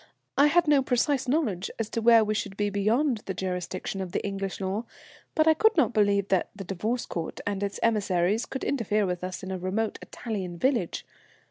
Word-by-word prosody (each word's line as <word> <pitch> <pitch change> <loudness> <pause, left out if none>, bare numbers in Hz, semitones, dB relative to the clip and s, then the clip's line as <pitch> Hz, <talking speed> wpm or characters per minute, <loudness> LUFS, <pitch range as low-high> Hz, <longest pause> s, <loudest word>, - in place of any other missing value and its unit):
I 285 - +6
had 335 +2 +3
no 290 -2 +5
precise 265 +1 +1
knowledge 245 - 0
as 225 - -2
to 230 - -1
where 230 0 +7
we 215 0 0
should 205 -2 -3
be 205 0 0
beyond 225 +6 +1
the 190 - -3
jurisdiction 185 +1 -3
of 185 -2 -6
the - - -1
English 195 -2 -3
law, 195 +4 -2 0.5
but 310 0 +3
I 320 - +7
could 435 +5 +3
not 305 - +3
believe 200 -2 +2
that 190 -2 +2
the 200 - -6
Divorce 215 +7 -2
Court 165 -2 -5
and 200 -1 -2
its 200 0 -3
emissaries 205 -2 +1
could 265 - -5
interfere 215 -5 +1
with 180 -1 -3
us 185 +1 -5
in 190 - -5
a 185 - -3
remote 205 +4 -2
Italian 190 -7 -5
village. 235 -4 0
205 Hz, 205 wpm, -27 LUFS, 190-240 Hz, 0.5 s, where